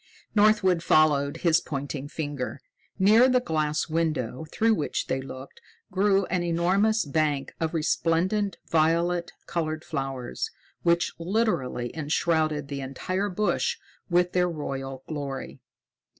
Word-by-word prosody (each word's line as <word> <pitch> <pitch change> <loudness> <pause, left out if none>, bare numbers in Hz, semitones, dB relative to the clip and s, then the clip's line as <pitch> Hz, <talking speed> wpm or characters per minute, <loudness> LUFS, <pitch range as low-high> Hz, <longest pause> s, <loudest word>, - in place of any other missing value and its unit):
Northwood 205 -5 +4
followed 145 -3 +3
his 165 -1 +5
pointing 140 -1 -4
finger. 145 -3 -4 0.4
Near 215 +6 +6
the 250 0 +4
glass 155 -8 -1
window 155 -4 -1
through 225 0 +3
which 155 -8 -1
they 135 - -1
looked 130 0 -10 0.3
grew 195 +1 +3
an 180 0 -1
enormous 185 +6 +2
bank 145 -2 0
of 160 0 -1
resplendent 170 +5 +1
violet 170 +2 +2
colored 155 -2 -3
flowers, 135 - -3 0.3
which 170 0 +2
literally 165 - -1
enshrouded 155 -1 0
the 140 -1 -4
entire 185 +9 -2
bush 215 - 0 0.3
with 175 0 +3
their 180 -1 +2
royal 135 -4 -5
glory. 140 -3 -5
165 Hz, 120 wpm, -26 LUFS, 145-185 Hz, 0.4 s, Near